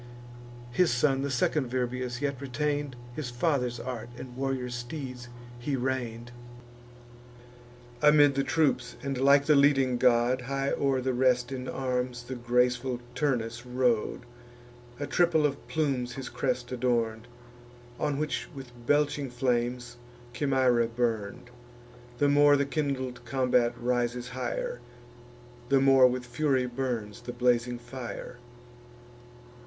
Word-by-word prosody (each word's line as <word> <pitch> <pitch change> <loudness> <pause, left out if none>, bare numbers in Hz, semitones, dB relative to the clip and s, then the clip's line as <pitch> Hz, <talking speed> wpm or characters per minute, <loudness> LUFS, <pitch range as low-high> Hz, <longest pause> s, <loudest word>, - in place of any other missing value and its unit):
His 170 +7 +3
son, 135 +2 +2
the 140 - -2
second 130 +1 +1
Virbius, 125 0 -2
yet 140 -2 -2
retain'd 145 0 -2 0.2
His 150 -5 -4
father's 125 -1 0
art, 120 -2 -5
and 125 -1 -9
warrior 130 -1 -2
steeds 125 0 -6 0.3
he 135 +3 -2
rein'd. 120 -2 -3 1.7
Amid 150 -1 +6
the 135 0 0
troops, 135 -7 +1
and 135 -1 -2
like 140 +1 +5
the 155 - +5
leading 135 -3 +4
god, 125 +1 +3
High 135 +2 -2
o'er 135 -2 +1
the 130 0 0
rest 125 0 +2
in 130 -1 -4
arms 125 -2 -2
the 125 +2 -6
graceful 125 +1 +1
Turnus 120 -4 -1
rode: 125 -2 0 0.8
A 145 - -2
triple 160 +1 +3
of 140 -1 -2
plumes 135 -6 -1
his 135 0 -6
crest 125 -2 -2
adorn'd, 120 -2 0 0.7
On 145 -2 0
which 150 0 -2
with 135 -3 -9 0.2
belching 145 -1 +2
flames 120 0 -1 0.4
Chimaera 130 -3 +2
burn'd: 115 0 -2 0.7
The 145 - +3
more 145 0 +6
the 140 - +1
kindled 130 -4 -3
combat 125 -1 +1
rises 120 0 -1
high'r, 125 -1 -3 0.9
The 135 0 +5
more 135 -1 +6
with 125 0 -2
fury 130 +1 +1
burns 120 -5 -3
the 120 - -6
blazing 120 0 +1
fire. 120 0 -8
125 Hz, 125 wpm, -28 LUFS, 120-140 Hz, 1.7 s, Amid